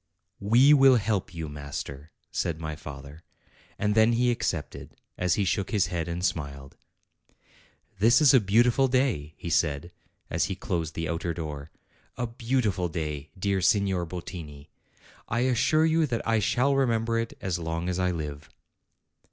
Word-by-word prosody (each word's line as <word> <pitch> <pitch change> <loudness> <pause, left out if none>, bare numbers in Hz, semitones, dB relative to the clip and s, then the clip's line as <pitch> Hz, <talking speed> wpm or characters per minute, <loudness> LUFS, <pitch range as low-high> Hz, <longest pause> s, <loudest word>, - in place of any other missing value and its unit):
"We 120 +8 +5
will 135 -2 +7
help 105 -5 -1
you, 80 -2 -5
master," 70 0 -7 0.2
said 80 -2 -2
my 80 -2 -4
father. 70 0 -10 0.6
And 105 0 0
then 110 +2 +4
he 120 +1 +2
accepted, 120 - -4 0.2
as 90 -2 +1
he 100 - 0
shook 100 +2 -1
his 95 -4 0
head 85 -1 -2
and 85 +2 -2
smiled. 70 -6 -4 1.2
"This 115 +4 +5
is 150 -4 +6
a 130 - +7
beautiful 120 +6 +3
day," 120 - 0
he 85 - -6
said, 75 +1 0 0.4
as - - 0
he - - -3
closed 80 -2 -3
the 80 0 -2
outer 85 +1 -2
door, 75 -3 -6 0.5
"a 120 - -1
beautiful 115 -5 -1
day, 75 -3 -4
dear 95 0 0
Signor 95 -2 +2
Bottini! 80 -5 -8 0.6
I 115 +2 0
assure 130 +5 +3
you 160 -1 +2
that 115 -4 -3
I 115 -1 +3
shall 130 +6 +2
remember 115 -3 +1
it 115 0 -4
as 90 -2 -2
long 85 +1 -3
as 90 0 -1
I 90 0 +1
live." 75 -4 -5
90 Hz, 160 wpm, -27 LUFS, 80-115 Hz, 1.2 s, will